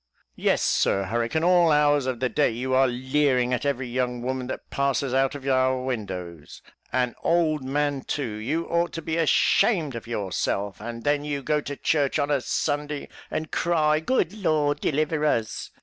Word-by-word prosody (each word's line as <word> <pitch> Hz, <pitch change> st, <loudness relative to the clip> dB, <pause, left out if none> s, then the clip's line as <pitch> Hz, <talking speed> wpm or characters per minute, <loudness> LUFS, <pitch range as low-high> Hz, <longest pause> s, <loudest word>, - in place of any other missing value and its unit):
Yes, -, -, +1 dB
Sir 100 Hz, -, +2 dB
Hurricane, 115 Hz, -, -1 dB
all 175 Hz, -2 st, +5 dB
hours 145 Hz, -2 st, +3 dB
of 130 Hz, -3 st, -2 dB
the 130 Hz, -, +1 dB
day 145 Hz, +4 st, +2 dB
you 125 Hz, +3 st, -3 dB
are 130 Hz, +1 st, +5 dB
leering 130 Hz, 0 st, +1 dB
at 125 Hz, -, -1 dB
every 135 Hz, -2 st, -1 dB
young 125 Hz, 0 st, -2 dB
woman 130 Hz, 0 st, -3 dB
that -, -, -6 dB
passes, 140 Hz, -1 st, 0 dB
out 135 Hz, +1 st, +2 dB
of 140 Hz, -1 st, -7 dB
our 130 Hz, -1 st, +2 dB
windows 90 Hz, -, -6 dB, 0.3 s
and 125 Hz, -1 st, +1 dB
an -, -, -24 dB
old 160 Hz, -4 st, +1 dB
man 145 Hz, +1 st, -1 dB
too; 145 Hz, -, -3 dB
you 150 Hz, +10 st, -2 dB
ought 170 Hz, 0 st, 0 dB
to 165 Hz, -, -4 dB
be 160 Hz, +1 st, -2 dB
ashamed 165 Hz, -, +3 dB
of 115 Hz, -1 st, -7 dB
yourself 100 Hz, -2 st, -2 dB
and 115 Hz, +1 st, -6 dB
then 145 Hz, 0 st, +1 dB
you 145 Hz, -2 st, -3 dB
go 150 Hz, +2 st, +1 dB
to 145 Hz, 0 st, -5 dB
church 145 Hz, -4 st, +1 dB
of 145 Hz, 0 st, 0 dB
a 140 Hz, -3 st, +2 dB
Sunday, 145 Hz, +3 st, -2 dB, 0.2 s
and 155 Hz, -, -4 dB
cry, 155 Hz, -3 st, +2 dB
'Good 180 Hz, 0 st, 0 dB
Lord, 155 Hz, -8 st, +1 dB
deliver 155 Hz, +1 st, 0 dB
us.'" 115 Hz, -7 st, -1 dB
140 Hz, 180 wpm, -25 LUFS, 125-150 Hz, 0.3 s, all